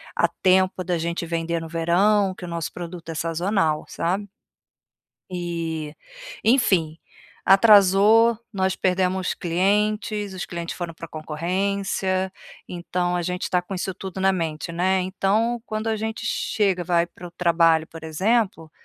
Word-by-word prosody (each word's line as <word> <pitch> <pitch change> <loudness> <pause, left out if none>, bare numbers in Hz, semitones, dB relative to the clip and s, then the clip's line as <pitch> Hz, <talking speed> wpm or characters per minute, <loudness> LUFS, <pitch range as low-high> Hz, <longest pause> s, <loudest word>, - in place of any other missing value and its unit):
a - - +3
tempo 185 0 +2
da 175 -1 -1
gente 170 +1 -2
vender 165 0 -2
no 165 - -7
verão, 185 +5 +2
que 185 - -12
o - - -5
nosso 170 -1 -4
produto 170 -1 -8
é - - -3
sazonal, 165 0 0
sabe? 190 +5 -2 1.1
E, 165 -3 -4 0.5
enfim, 190 - +3 0.5
atrasou, 210 +3 +6 0.2
nós 190 -2 0
perdemos 185 0 0
clientes, 205 +3 0
os 185 - -4
clientes 170 -1 -5
foram 175 -2 -4
pra 165 0 -9
concorrência, 185 +4 -2 0.4
então 175 0 -2
a 175 - 0
gente 180 +1 -3
tá 180 -1 +1
com 180 - -10
isso 190 0 -3
tudo 190 0 -7
na 190 0 +3
mente, 165 -3 -3
né, 185 +3 +1
então 210 +5 0
quando 215 -1 -4
a 225 - +1
gente 220 +1 -4
chega, 195 -4 0
vai 170 0 +2
para 175 +1 -11
o - - -16
trabalho, 165 -2 +3
por 165 0 -11
exemplo, 190 +1 0
180 Hz, 145 wpm, -23 LUFS, 170-195 Hz, 1.1 s, atrasou